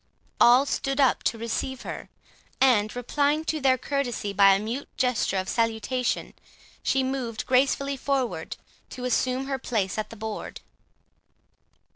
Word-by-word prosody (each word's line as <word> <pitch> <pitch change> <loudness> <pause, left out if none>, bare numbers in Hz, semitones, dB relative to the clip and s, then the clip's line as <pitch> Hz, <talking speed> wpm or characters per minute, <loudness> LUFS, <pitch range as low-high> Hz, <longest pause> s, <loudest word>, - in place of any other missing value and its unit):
All 250 +3 +7
stood 275 0 -2
up 270 -3 +3
to 230 - +1
receive 235 +3 -3
her; - - -7 0.5
and, 225 -5 +3
replying 290 +5 0
to 315 -2 -2
their 260 -1 +4
courtesy 245 -7 -2
by 195 0 +6
a - - 0
mute 230 +7 -4
gesture 250 -6 +1
of 185 0 -2
salutation, 230 +3 -1 0.5
she 270 - +1
moved 260 -4 -3
gracefully 275 +2 +2
forward 265 -2 -2 0.3
to 250 - -7
assume 255 +2 0
her 270 -1 -3
place 215 -5 -1
at 215 - -3
the - - -10
board. 220 0 -6
250 Hz, 140 wpm, -26 LUFS, 225-270 Hz, 0.5 s, All